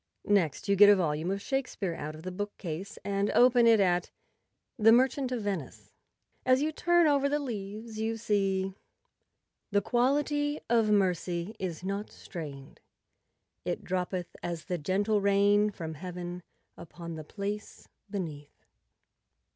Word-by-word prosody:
Next 190 Hz, -8 st, +1 dB
you 200 Hz, -, +3 dB
get 205 Hz, +1 st, +8 dB
a 205 Hz, -, +8 dB
volume 160 Hz, -2 st, -1 dB
of 195 Hz, +1 st, -2 dB
Shakespeare 255 Hz, -9 st, -2 dB
out 155 Hz, -1 st, -6 dB
of 155 Hz, -, -11 dB
the 185 Hz, -, -4 dB
bookcase 195 Hz, -2 st, -5 dB
and 200 Hz, 0 st, 0 dB
open 245 Hz, -1 st, +6 dB
it 225 Hz, -2 st, +6 dB
at 180 Hz, -2 st, +2 dB, 0.7 s
'The 220 Hz, +1 st, +7 dB
Merchant 260 Hz, +2 st, +3 dB
of 240 Hz, -4 st, -2 dB
Venice." 195 Hz, -8 st, -5 dB, 0.5 s
As 255 Hz, 0 st, +4 dB
you 305 Hz, +2 st, 0 dB
turn 345 Hz, +2 st, +3 dB
over 280 Hz, -2 st, +3 dB
the 295 Hz, -, +1 dB
leaves 215 Hz, -4 st, -6 dB
you 225 Hz, +1 st, -1 dB
see— 195 Hz, -3 st, 0 dB, 0.5 s
" -, -, -54 dB
The 200 Hz, 0 st, +2 dB
quality 290 Hz, +4 st, +1 dB
of 230 Hz, -2 st, +3 dB
mercy 185 Hz, -1 st, 0 dB
is 180 Hz, -2 st, -4 dB
not 200 Hz, +2 st, -3 dB
strain'd. 145 Hz, -7 st, -9 dB, 0.8 s
It -, -, -3 dB
droppeth 180 Hz, -1 st, -3 dB
as 170 Hz, -2 st, -4 dB
the 180 Hz, -3 st, -2 dB
gentle 200 Hz, +6 st, +1 dB
rain 200 Hz, +1 st, +4 dB
from 165 Hz, -5 st, -6 dB
heaven 175 Hz, +2 st, -6 dB, 0.3 s
Upon 170 Hz, 0 st, -9 dB
the 160 Hz, -1 st, -6 dB
place 205 Hz, +5 st, -6 dB, 0.2 s
beneath." 160 Hz, -8 st, -6 dB
200 Hz, 145 wpm, -29 LUFS, 175-225 Hz, 0.8 s, get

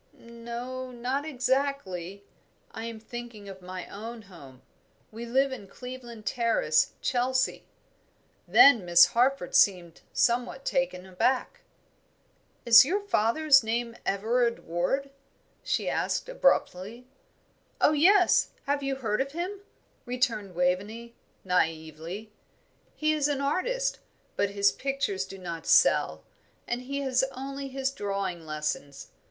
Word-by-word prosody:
"No, 235 Hz, +2 st, -7 dB
not 255 Hz, +4 st, -3 dB
exactly. 255 Hz, -, -2 dB, 0.5 s
I 225 Hz, -, -6 dB
am 230 Hz, -1 st, -6 dB
thinking 235 Hz, -2 st, -9 dB
of 190 Hz, -1 st, -10 dB
my 185 Hz, 0 st, -7 dB
own 225 Hz, +3 st, -8 dB
home. 140 Hz, -10 st, -15 dB, 0.5 s
We 230 Hz, +2 st, -7 dB
live 265 Hz, +3 st, +2 dB
in 220 Hz, -7 st, -7 dB
Cleveland 245 Hz, -2 st, -10 dB
Terrace, 235 Hz, -, +1 dB
Chelsea." 255 Hz, +1 st, 0 dB, 0.8 s
Then 275 Hz, -8 st, +7 dB
Miss 175 Hz, 0 st, +7 dB
Harford 250 Hz, -5 st, +1 dB
seemed 175 Hz, -4 st, +3 dB
somewhat 245 Hz, +3 st, 0 dB
taken 265 Hz, -9 st, -1 dB
aback. 190 Hz, +8 st, -1 dB, 1.0 s
"Is 235 Hz, -1 st, +9 dB
your 360 Hz, +10 st, 0 dB
father's 275 Hz, -, +3 dB
name 230 Hz, +1 st, -2 dB
Everard 235 Hz, +4 st, 0 dB
Ward?" 180 Hz, +12 st, -1 dB, 0.5 s
she -, -, -1 dB
asked, -, -, -1 dB
abruptly. 240 Hz, -, 0 dB, 0.7 s
"Oh, -, -, +5 dB
yes, 360 Hz, +5 st, +4 dB
have 285 Hz, +1 st, -1 dB
you 275 Hz, -1 st, -2 dB
heard 225 Hz, -3 st, -1 dB
of 275 Hz, +1 st, -4 dB
him?" 365 Hz, +5 st, -4 dB, 0.5 s
returned 230 Hz, -6 st, -1 dB
Waveney, 205 Hz, +7 st, -1 dB, 0.3 s
naively. 165 Hz, +3 st, -2 dB, 0.6 s
"He 310 Hz, 0 st, +1 dB
is 295 Hz, -2 st, +1 dB
an 290 Hz, -2 st, -1 dB
artist, 480 Hz, -, -1 dB, 0.4 s
but 200 Hz, -, +1 dB
his 200 Hz, 0 st, +3 dB
pictures 270 Hz, -9 st, -2 dB
do 195 Hz, 0 st, -10 dB
not 170 Hz, -3 st, -7 dB
sell, -, -, +4 dB, 0.4 s
and 240 Hz, +1 st, -2 dB
he 280 Hz, +2 st, -4 dB
has 265 Hz, -1 st, +1 dB
only 275 Hz, +1 st, -6 dB
his 270 Hz, 0 st, -2 dB
drawing 195 Hz, -7 st, -4 dB
lessons. 150 Hz, -2 st, -4 dB
235 Hz, 120 wpm, -27 LUFS, 195-270 Hz, 1.0 s, Is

